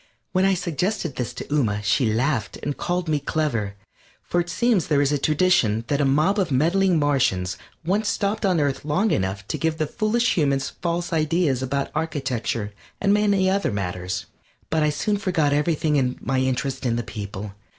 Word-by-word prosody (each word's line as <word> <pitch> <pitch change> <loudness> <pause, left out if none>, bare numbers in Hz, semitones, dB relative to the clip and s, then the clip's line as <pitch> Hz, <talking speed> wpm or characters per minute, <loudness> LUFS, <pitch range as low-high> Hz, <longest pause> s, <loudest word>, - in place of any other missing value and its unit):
When 185 +1 +2
I 195 0 +3
suggested 175 -2 -2
this 125 -1 -3
to - - -5
Ooma 105 -8 +1
she 110 +2 +2
laughed 115 -2 0
and 145 -1 -2
called 175 0 -2
me 150 -2 +1
clever, 125 -9 -1 0.5
for 175 - 0
it 175 - -6
seems 235 -5 +2
there 150 -3 +3
is 145 0 +2
a 145 - +1
tradition 150 -8 +2
that 145 0 +1
a - - +3
mob 155 +10 +3
of 185 -4 +1
meddling 170 +7 +3
Martians 130 -11 +1 0.3
once 200 +4 +1
stopped 210 +1 -1
on 185 -4 +3
Earth 140 -2 0
long 170 +9 +1
enough 100 +1 -1
to - - -2
give 160 -1 0
the 155 - 0
foolish 230 +8 +1
humans 140 -4 +1
false 170 0 -1
ideas 155 -4 +1
about 140 +1 -2
architecture 130 -9 -2 0.3
and 200 0 +3
many 200 -2 +3
other 195 -6 +1
matters. 90 -2 -3 0.5
But 160 0 +2
I 150 - +3
soon 205 +7 0
forgot 165 -7 +1
everything 150 0 +1
in 125 -2 0
my 130 +1 -1
interest 130 +1 -1
in 120 -3 +1
the 120 - -1
people. 100 -1 -6
150 Hz, 185 wpm, -23 LUFS, 125-180 Hz, 0.5 s, I